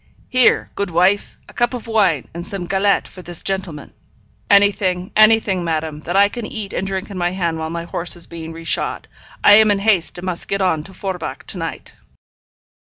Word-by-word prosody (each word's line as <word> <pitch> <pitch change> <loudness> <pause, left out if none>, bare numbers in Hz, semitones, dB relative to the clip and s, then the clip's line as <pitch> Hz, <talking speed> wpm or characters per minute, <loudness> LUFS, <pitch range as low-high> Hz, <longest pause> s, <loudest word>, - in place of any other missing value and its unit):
'Here, 255 -1 +3
good 200 -2 -2
wife, 180 +4 +2
a - - -15
cup 240 +1 0
of 245 - -7
wine 200 - +1
and 170 +1 -6
some 195 -1 -5
galette 195 +2 +1
for 185 - -12
this 175 -1 -2
gentleman.' 190 -6 -4 0.6
'Anything, 195 -2 +3
anything, 215 -4 +4
madame, 160 -2 -2
that 175 +4 -5
I 200 +1 +6
can 235 +3 -6
eat 210 -3 -6
and 190 - -2
drink 195 +1 -4
in 190 - -5
my 175 0 +1
hand 170 -3 -2
while 160 0 -3
my 170 0 -4
horse 170 +1 -2
is 175 - -4
being 165 0 -8
shod. 165 - -1 0.4
I 205 - +8
am 220 0 +6
in 205 - +3
haste, 195 -4 +1
and 175 - -7
must 180 -2 -3
get 195 - -1
on 180 -5 +1
to 190 - -11
Forbach 180 -9 -5
to 185 - -6
night.' 165 0 -6
185 Hz, 200 wpm, -19 LUFS, 170-200 Hz, 0.6 s, I